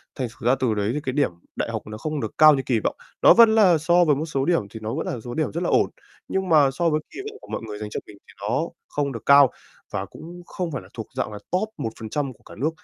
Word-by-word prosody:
Thành 130 Hz, -3 st, -2 dB
thử 115 Hz, -, -3 dB
ra 130 Hz, -, +5 dB
từ 125 Hz, -4 st, +1 dB
đấy 105 Hz, +1 st, 0 dB
thì 150 Hz, -, -1 dB
cái 130 Hz, -, -2 dB
điểm 145 Hz, -8 st, +2 dB, 0.2 s
đại -, -, -2 dB
học -, -, -3 dB
nó 110 Hz, 0 st, -7 dB
không 150 Hz, +5 st, -3 dB
được 110 Hz, -, -5 dB
cao 155 Hz, -1 st, +8 dB
như 135 Hz, -, -1 dB
kỳ 120 Hz, -4 st, +1 dB
vọng. -, -, -2 dB, 0.3 s
Nó -, -, +8 dB
vẫn 230 Hz, -1 st, +7 dB
là 190 Hz, -6 st, +6 dB
so 175 Hz, +3 st, +3 dB
với 150 Hz, -3 st, +4 dB
một 150 Hz, +3 st, -2 dB
số 135 Hz, -4 st, -1 dB
điểm 175 Hz, 0 st, +2 dB
thì 110 Hz, -, -9 dB
nó 110 Hz, -, -3 dB
vẫn -, -, -3 dB
là 120 Hz, -, -3 dB
số 120 Hz, +2 st, -7 dB
điểm 155 Hz, +2 st, -1 dB
rất 170 Hz, -, -3 dB
là -, -, 0 dB
ổn. -, -, +3 dB, 0.4 s
Nhưng 190 Hz, -1 st, -2 dB
mà 150 Hz, -4 st, +5 dB
so 165 Hz, +5 st, +1 dB
với 155 Hz, -1 st, +1 dB
kỳ -, -, -10 dB
vọng 430 Hz, -, -13 dB
của -, -, -14 dB
mọi -, -, -4 dB
người 105 Hz, -1 st, -6 dB
dành 105 Hz, 0 st, -5 dB
cho -, -, -4 dB
mình 105 Hz, -, -13 dB
thì -, -, -16 dB
nó 135 Hz, +11 st, -1 dB, 0.2 s
không 145 Hz, -1 st, -2 dB
được 115 Hz, -4 st, -7 dB
cao 140 Hz, -1 st, +7 dB, 0.4 s
và -, -, -2 dB
cũng 170 Hz, +3 st, -11 dB
không 175 Hz, -2 st, -4 dB
phải 135 Hz, -, -4 dB
là -, -, -16 dB
thuộc 110 Hz, -2 st, -6 dB
dạng 130 Hz, -4 st, -2 dB
là 105 Hz, -, -7 dB
top 195 Hz, +4 st, 0 dB
1% 130 Hz, +2 st, -4 dB
của -, -, -27 dB
cả -, -, -13 dB
nước. 140 Hz, +7 st, +1 dB
140 Hz, 300 wpm, -24 LUFS, 115-165 Hz, 0.4 s, cao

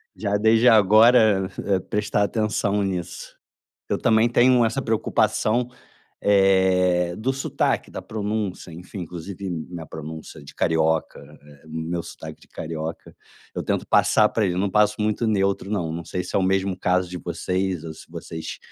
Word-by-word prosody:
já 100 Hz, -1 st, -1 dB
desde 110 Hz, +3 st, +4 dB
agora 110 Hz, -2 st, +5 dB, 0.4 s
prestar 105 Hz, 0 st, 0 dB
atenção 105 Hz, -1 st, 0 dB
nisso. 90 Hz, -2 st, -5 dB, 0.5 s
Eu -, -, 0 dB
também 110 Hz, +1 st, +3 dB
tenho 120 Hz, 0 st, +4 dB
essa 115 Hz, +4 st, 0 dB
preocupação, 115 Hz, +1 st, +1 dB, 0.5 s
eh, 95 Hz, -3 st, +3 dB
do 120 Hz, +5 st, 0 dB
sotaque, 135 Hz, -, -1 dB
da -, -, -6 dB
pronúncia, 105 Hz, -4 st, -4 dB
enfim 90 Hz, +4 st, -9 dB
inclusive 90 Hz, +3 st, -7 dB
minha 85 Hz, 0 st, -6 dB
pronúncia 80 Hz, -1 st, -9 dB
de 70 Hz, -, -13 dB
carioca, 80 Hz, -1 st, 0 dB, 0.2 s
eh, 75 Hz, -1 st, -18 dB
meu 80 Hz, +2 st, -4 dB
sotaque -, -, -10 dB
de -, -, -19 dB
carioca, 80 Hz, 0 st, -6 dB, 0.4 s
eu -, -, -3 dB
tento -, -, -1 dB
passar 105 Hz, 0 st, +4 dB
para 110 Hz, -, 0 dB
ele, 90 Hz, -, 0 dB
eu -, -, -1 dB
não 100 Hz, +1 st, 0 dB
passo 105 Hz, +1 st, +3 dB
muito 110 Hz, +2 st, 0 dB
neutro 100 Hz, -2 st, 0 dB
não, 90 Hz, -6 st, -2 dB
não 85 Hz, +1 st, -6 dB
sei 90 Hz, +2 st, -3 dB
se 90 Hz, -, -6 dB
é -, -, +4 dB
o -, -, +1 dB
mesmo 95 Hz, 0 st, 0 dB
caso 90 Hz, 0 st, +1 dB
de 90 Hz, -, -6 dB
vocês 90 Hz, 0 st, -2 dB
ou 80 Hz, -1 st, -7 dB
se -, -, -14 dB
vocês 80 Hz, 0 st, -7 dB
95 Hz, 160 wpm, -23 LUFS, 85-105 Hz, 0.5 s, agora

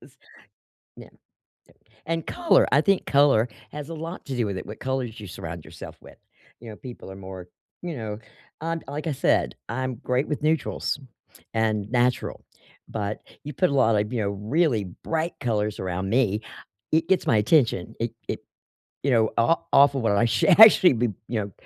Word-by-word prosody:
'cause -, -, -19 dB, 0.8 s
Yeah, -, -, -12 dB, 1.0 s
and 165 Hz, 0 st, -2 dB
color 350 Hz, -1 st, +3 dB
I 140 Hz, -, +6 dB
think 195 Hz, +2 st, +1 dB
color 140 Hz, -5 st, +4 dB, 0.2 s
has 150 Hz, 0 st, -7 dB
a 165 Hz, -, -6 dB
lot 165 Hz, +3 st, -7 dB
to 135 Hz, -3 st, -4 dB
do 120 Hz, -3 st, +1 dB
with 100 Hz, -2 st, -3 dB
it, -, -, -8 dB
what 105 Hz, -, -9 dB
colors 130 Hz, -4 st, -3 dB
you 105 Hz, -, -8 dB
surround 85 Hz, -2 st, -7 dB
yourself -, -, -10 dB
with. -, -, -15 dB, 0.4 s
You 115 Hz, -1 st, -9 dB
know, 105 Hz, -, -9 dB
people 120 Hz, -5 st, -10 dB
are 95 Hz, -, -9 dB
more, 95 Hz, -2 st, -9 dB, 0.3 s
you 175 Hz, -4 st, -4 dB
know? 110 Hz, -2 st, -5 dB, 0.4 s
Um, 165 Hz, +1 st, -2 dB
like 150 Hz, +3 st, -5 dB
I 155 Hz, -, 0 dB
said, 60 Hz, -, +1 dB
I'm 130 Hz, +1 st, -3 dB
great 125 Hz, +2 st, -1 dB
with 150 Hz, -, -3 dB
neutrals 155 Hz, -1 st, 0 dB, 0.6 s
and 110 Hz, -2 st, 0 dB
natural, 125 Hz, 0 st, 0 dB, 0.4 s
but 105 Hz, -1 st, -4 dB, 0.2 s
you 150 Hz, -, -6 dB
put 185 Hz, +5 st, +2 dB
a 140 Hz, -, -1 dB
lot 115 Hz, -5 st, +4 dB
of, 105 Hz, +3 st, -2 dB
you 120 Hz, -, -1 dB
know, 100 Hz, -, -1 dB
really 110 Hz, -, 0 dB, 0.2 s
bright 165 Hz, +1 st, -1 dB
colors 105 Hz, -3 st, -1 dB
around 95 Hz, +1 st, -3 dB
me, 110 Hz, -3 st, +1 dB, 0.5 s
it 160 Hz, +2 st, +2 dB
gets 190 Hz, -2 st, +2 dB
my 115 Hz, -, +3 dB
attention. 115 Hz, -, +2 dB
It 115 Hz, 0 st, -1 dB, 0.2 s
it -, -, -3 dB, 0.6 s
you 140 Hz, -, +1 dB
know, 115 Hz, -3 st, +3 dB
o 140 Hz, +9 st, +4 dB, 0.2 s
off 140 Hz, 0 st, +6 dB
of 135 Hz, -, -1 dB
what 115 Hz, -, +2 dB
I 100 Hz, +3 st, +3 dB
sh 115 Hz, -, -2 dB
should 185 Hz, -, +5 dB
actually 205 Hz, -7 st, +9 dB
be, 120 Hz, +1 st, +1 dB, 0.2 s
you 115 Hz, -, -1 dB
know, 100 Hz, -1 st, -6 dB
120 Hz, 190 wpm, -25 LUFS, 105-150 Hz, 1.0 s, actually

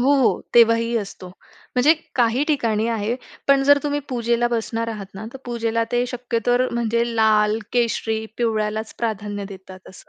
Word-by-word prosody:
हो, 270 Hz, 0 st, +3 dB
तेव्हाही 230 Hz, 0 st, +5 dB
असतो. 195 Hz, -3 st, -8 dB, 0.5 s
म्हणजे 265 Hz, +6 st, +5 dB, 0.2 s
काही 240 Hz, +2 st, +2 dB
ठिकाणी 230 Hz, -8 st, 0 dB
आहे, 225 Hz, 0 st, -1 dB, 0.3 s
पण 275 Hz, -1 st, +5 dB
जर 285 Hz, +1 st, +6 dB
तुम्ही 290 Hz, 0 st, -1 dB
पूजेला 240 Hz, -1 st, 0 dB
बसणार 230 Hz, 0 st, -2 dB
आहात 210 Hz, -4 st, -5 dB
ना, 200 Hz, +3 st, -7 dB
तर 265 Hz, -, -9 dB
पूजेला 230 Hz, -1 st, -1 dB
ते 245 Hz, 0 st, +2 dB
शक्यतो 245 Hz, -1 st, -1 dB, 0.2 s
म्हणजे 235 Hz, 0 st, +1 dB
लाल, 215 Hz, -1 st, +3 dB
केशरी, 225 Hz, -2 st, 0 dB
पिवळ्यालाच 220 Hz, -2 st, -1 dB
प्राधान्य 205 Hz, -3 st, -3 dB
देतात 190 Hz, -1 st, -12 dB
असं. 190 Hz, -, -15 dB
230 Hz, 150 wpm, -22 LUFS, 215-245 Hz, 0.5 s, जर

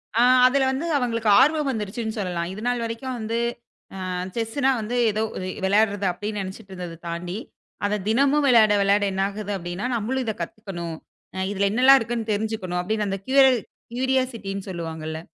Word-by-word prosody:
அ. 235 Hz, -, +4 dB, 0.3 s
அதுல 265 Hz, +1 st, +2 dB
வந்து 270 Hz, +5 st, -2 dB
அவங்களுக்கு 230 Hz, -4 st, 0 dB
ஆர்வம் 300 Hz, 0 st, +3 dB
வந்திருச்சுன்னு 220 Hz, 0 st, -4 dB
சொல்லலாம். 175 Hz, -3 st, -2 dB
இதுநாள் 235 Hz, +4 st, -2 dB
வரைக்கும் 230 Hz, +3 st, -4 dB
வந்து, 225 Hz, +1 st, -2 dB, 0.7 s
அ. -, -, -3 dB, 0.3 s
செஸ்ன்னா 240 Hz, +4 st, +1 dB
வந்து 220 Hz, +3 st, -3 dB, 0.2 s
ஏதோ 215 Hz, +1 st, -1 dB
ஒரு 185 Hz, -, -4 dB, 0.2 s
விளையாடுறது 205 Hz, 0 st, +2 dB
அப்டின்னு 210 Hz, +3 st, -4 dB
நெனச்சுட்டு 195 Hz, +1 st, -8 dB
இருந்தது 175 Hz, -2 st, -7 dB
தாண்டி, 175 Hz, +3 st, -4 dB, 0.5 s
அதத் 205 Hz, -2 st, -2 dB
தினமும் 280 Hz, +5 st, +3 dB
விளையாட 225 Hz, -4 st, +6 dB
விளையாட 200 Hz, +1 st, +3 dB
என்னாகுது 200 Hz, +2 st, -2 dB
அப்டின்னா 175 Hz, +4 st, -5 dB
நம்மளும் 250 Hz, +4 st, -1 dB
இதக் 220 Hz, -5 st, -3 dB
கத்துக்கணும், 170 Hz, -3 st, -6 dB, 0.4 s
அ -, -, -3 dB
இதுல 200 Hz, 0 st, +1 dB
என்னெல்லாம் 260 Hz, +4 st, +7 dB
இருக்குன்னு 225 Hz, -1 st, -3 dB
தெரிஞ்சுக்கணும் 205 Hz, -4 st, -2 dB
அப்டின்னு 210 Hz, +3 st, -1 dB
அந்த 195 Hz, 0 st, -2 dB
க்யூ 265 Hz, +1 st, +1 dB, 0.6 s
க்யூரியாசிட்டின்னு 250 Hz, -7 st, -1 dB
சொல்லுவாங்க 165 Hz, -3 st, -5 dB
இல்ல? 160 Hz, 0 st, -4 dB
215 Hz, 155 wpm, -24 LUFS, 190-240 Hz, 0.7 s, என்னெல்லாம்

